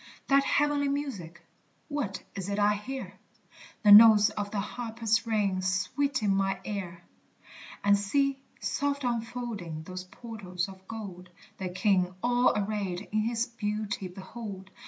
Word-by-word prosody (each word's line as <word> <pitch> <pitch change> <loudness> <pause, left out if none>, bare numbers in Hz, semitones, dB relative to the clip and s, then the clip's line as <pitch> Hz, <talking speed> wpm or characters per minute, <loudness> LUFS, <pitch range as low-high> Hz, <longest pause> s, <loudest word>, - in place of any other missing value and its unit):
That 275 0 +5
heavenly 290 0 +2
music! 205 - -4 0.4
what 285 -10 -3
is 195 -1 -5
it 200 - -1
I 210 0 +4
hear? 255 +6 -6 0.6
The 205 - +7
notes 215 0 +9
of 205 -1 -4
the 205 - -2
harpers 225 +1 -1
ring 200 -4 +1
sweet 195 +9 0
in 200 -2 +3
mine 195 0 +1
ear! 180 -4 -5 0.8
And 205 0 +5
see, 270 +7 +1 0.2
soft 285 0 -1
unfolding 230 -9 -3
those 185 +2 -7
portals 190 -3 -5
of 190 -1 -13
gold, 190 -5 -8 0.3
The 190 -1 -3
King 185 -1 +1
all 245 +1 +4
arrayed 200 -3 -2
in 215 - +1
his 230 +1 0
beauty 210 -4 -3
behold! 190 +1 -8
210 Hz, 135 wpm, -29 LUFS, 190-235 Hz, 0.8 s, notes